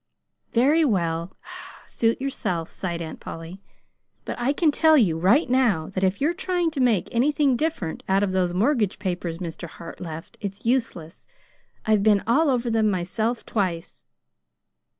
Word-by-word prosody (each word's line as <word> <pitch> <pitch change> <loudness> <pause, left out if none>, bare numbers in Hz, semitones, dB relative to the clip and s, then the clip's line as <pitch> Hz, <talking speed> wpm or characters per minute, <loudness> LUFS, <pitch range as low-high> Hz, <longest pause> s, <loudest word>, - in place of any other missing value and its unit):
"Very 285 +7 +4
well; 170 - -1 0.5
suit 230 +2 0
yourself," 180 -11 -3
sighed 170 -3 -4
Aunt 160 - -8
Polly. 165 +4 -8 0.6
"But - - -4
I 245 +3 +1
can 305 +1 +2
tell 315 +1 +5
you 195 - +3
right 195 - +3
now 240 -11 +2
that 190 - -2
if 190 +1 +1
you're 305 +5 +1
trying 355 -2 -1
to 295 - -5
make 235 -7 +2
anything 275 +2 +2
different 270 - -2
out 195 +1 +3
of 195 - 0
those 185 -2 +1
mortgage 210 +2 +1
papers 175 -3 -3
Mr. 170 -1 -6
Hart 165 +1 -11
left, 165 -1 -8
it's 200 0 -6
useless. 225 -9 -2 0.6
I've 215 -2 +3
been 205 -1 +3
all 285 +7 +3
over 245 -2 0
them 220 -1 +2
myself 215 +6 -2
twice." 180 -6 -3
210 Hz, 155 wpm, -24 LUFS, 175-260 Hz, 0.6 s, tell